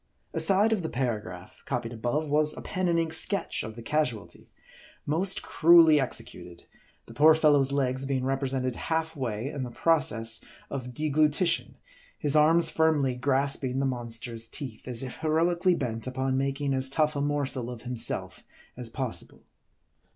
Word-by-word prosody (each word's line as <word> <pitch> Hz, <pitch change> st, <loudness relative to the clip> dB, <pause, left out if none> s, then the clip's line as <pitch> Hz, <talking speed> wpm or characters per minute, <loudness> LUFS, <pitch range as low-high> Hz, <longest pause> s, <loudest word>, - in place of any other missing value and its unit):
Aside 205 Hz, +3 st, +4 dB
of 210 Hz, -, -1 dB
the 160 Hz, -, -4 dB
paragraph, 105 Hz, -8 st, -4 dB
copied 120 Hz, -3 st, -3 dB
above, 120 Hz, +7 st, -2 dB
was 150 Hz, +1 st, +1 dB
a -, -, -6 dB
pen 185 Hz, -1 st, -2 dB
and 170 Hz, -1 st, +2 dB
ink 165 Hz, -1 st, -1 dB
sketch 200 Hz, -2 st, +1 dB
of 110 Hz, 0 st, -7 dB
the 115 Hz, -, -10 dB
casualty, 125 Hz, -7 st, -3 dB, 0.6 s
most 180 Hz, +6 st, +1 dB
cruelly 165 Hz, -2 st, +6 dB
executed; 90 Hz, -9 st, -6 dB, 0.4 s
the 115 Hz, -, -13 dB
poor 155 Hz, +5 st, +6 dB
fellow's 145 Hz, -4 st, +3 dB
legs 135 Hz, -1 st, 0 dB
being 130 Hz, -2 st, -1 dB
represented 135 Hz, -2 st, -1 dB
half 160 Hz, 0 st, -2 dB
way 120 Hz, -3 st, -3 dB
in 145 Hz, -3 st, -5 dB
the 125 Hz, -, -4 dB
process 115 Hz, -5 st, +1 dB, 0.3 s
of 125 Hz, -3 st, -6 dB
deglutition; 155 Hz, +4 st, +1 dB, 0.4 s
his 145 Hz, 0 st, +1 dB
arms 160 Hz, +3 st, +5 dB
firmly 155 Hz, -5 st, +2 dB
grasping 135 Hz, 0 st, 0 dB
the 135 Hz, -, 0 dB
monster's 115 Hz, -2 st, -5 dB
teeth, 130 Hz, -4 st, -7 dB
as 125 Hz, 0 st, -1 dB
if 130 Hz, -, -7 dB
heroically 170 Hz, +3 st, +1 dB
bent 115 Hz, -4 st, -4 dB
upon 130 Hz, +1 st, -1 dB
making 135 Hz, +1 st, -1 dB
as 130 Hz, 0 st, 0 dB
tough 150 Hz, +2 st, +1 dB
a 140 Hz, -, -1 dB
morsel 140 Hz, -4 st, -1 dB
of 120 Hz, -2 st, -8 dB
him 125 Hz, 0 st, -5 dB
self 115 Hz, -, -1 dB, 0.3 s
as 120 Hz, -2 st, -5 dB
possible. 130 Hz, -1 st, -5 dB
135 Hz, 160 wpm, -27 LUFS, 125-155 Hz, 0.6 s, cruelly